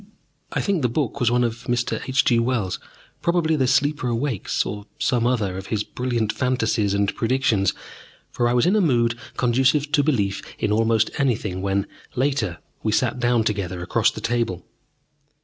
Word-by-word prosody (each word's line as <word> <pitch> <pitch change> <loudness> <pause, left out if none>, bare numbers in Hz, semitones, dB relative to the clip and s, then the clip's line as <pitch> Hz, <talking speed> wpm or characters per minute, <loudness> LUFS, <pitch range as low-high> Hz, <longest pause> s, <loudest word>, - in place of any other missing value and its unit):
I - - -1
think 195 -5 0
the 125 - +2
book 140 +2 -2
was 120 -3 +3
one 125 +1 +2
of 115 0 -3
Mr. 120 0 -1
H. 135 +1 +3
G. 120 -2 +4
Wells', 115 -6 -1 0.4
probably 170 -2 +2
"The 130 -4 +1
Sleeper 145 +1 +1
Awakes," 120 -2 -1
or 105 +1 -6
some 120 -2 +1
other 105 -7 0
of 95 - -9
his 105 -2 -1
brilliant 120 -3 -2
fantasies 115 -5 0
and 100 0 +1
predictions, 115 -6 +1 0.6
for 120 - +1
I - - +1
was 120 - +3
in 185 +4 +3
a 215 - +4
mood 120 -8 +2 0.2
conducive 130 +4 +2
to 145 0 +4
belief 105 -10 0 0.2
in 105 - -1
almost 110 0 +2
anything 105 -9 0
when, 100 +1 0 0.3
later, 125 -9 0 0.2
we 110 - 0
sat 120 +2 +1
down 120 -1 +2
together 95 -5 -2
across 115 +5 +2
the 110 - -8
table. 115 -6 -1
120 Hz, 175 wpm, -23 LUFS, 105-130 Hz, 0.6 s, G